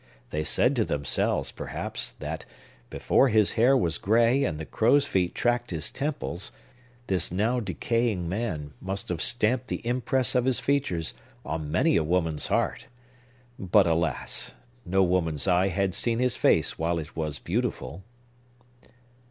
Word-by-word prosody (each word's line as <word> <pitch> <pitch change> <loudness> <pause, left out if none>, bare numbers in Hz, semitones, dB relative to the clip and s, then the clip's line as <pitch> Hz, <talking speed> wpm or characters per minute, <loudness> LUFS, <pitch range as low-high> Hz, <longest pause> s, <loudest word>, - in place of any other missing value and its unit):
They 75 0 -1
said 125 - +2
to 115 - +3
themselves, 70 -7 0
perhaps, - - -5
that, - - -6 0.5
before 135 - +2
his 105 -3 +3
hair 125 +4 +4
was 85 -9 0
gray 115 +6 +3
and 80 - -1
the 80 - -6
crow's 135 - +3
feet 90 -9 0
tracked 120 0 0
his 80 -3 -3
temples, 100 - -4 0.5
this 90 -5 0
now 110 +7 +1
decaying 105 -1 -1
man 85 -7 -3
must 95 +1 -4
have 85 -2 -2
stamped 120 +2 +2
the - - -5
impress 125 0 0
of 125 -1 +2
his 130 -2 +3
features 130 - 0 0.3
on 75 0 -4
many 155 - +3
a - - +2
woman's 80 -3 0
heart. - - -1 0.7
But, 95 -2 +4
alas! 80 -5 -1 0.3
no 95 +2 +3
woman's 85 -4 0
eye 90 +1 +3
had 95 0 0
seen 115 +4 0
his 125 0 +1
face - - +2
while 85 +1 0
it 80 -3 -7
was 75 -3 -2
beautiful. 80 +7 -3
95 Hz, 150 wpm, -27 LUFS, 80-120 Hz, 0.7 s, hair